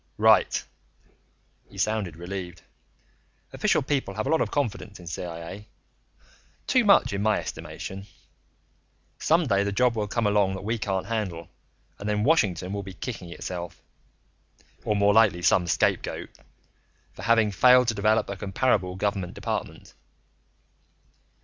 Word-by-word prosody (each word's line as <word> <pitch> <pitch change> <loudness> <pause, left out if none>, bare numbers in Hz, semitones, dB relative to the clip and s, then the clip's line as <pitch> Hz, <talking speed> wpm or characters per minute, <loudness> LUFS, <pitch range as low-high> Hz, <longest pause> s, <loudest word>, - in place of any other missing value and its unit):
"Right." - - +4 1.0
He - - -15
sounded 105 -7 -1
relieved. 90 -1 -7 0.9
Official - - +1
people 135 -8 -2
have 110 - -2
a - - -1
lot 160 - +3
of - - 0
confidence 110 -7 -3
in 90 - -12
CIA; 85 +3 -7 1.0
too 255 - +3
much, 200 - +4
in 100 - -2
my 110 +1 +2
estimation. 95 +1 -7 1.1
Some 165 +1 +3
day 100 -6 +2
the 100 - -1
job 120 +4 +2
will 105 -2 -1
come 115 +2 -1
along 100 -2 +2
that 95 - -7
we 115 +2 -2
can't 95 -2 -2
handle, 95 -7 -4 0.5
and 105 - -4
then 105 0 0
Washington 100 - +1
will 100 - -3
be 95 -1 -9
kicking 100 -5 -6
itself 85 0 -6 1.0
or, 105 - 0
more 100 0 +4
likely, 105 -5 +4
some 90 +2 +3
scapegoat - - 0 0.8
for - - -11
having 115 -2 +3
failed 125 +4 +5
to - - +1
develop 110 +1 +2
a 100 - -4
comparable 95 -1 0
government 95 -2 -2
department. - - -5
100 Hz, 140 wpm, -26 LUFS, 95-110 Hz, 1.1 s, failed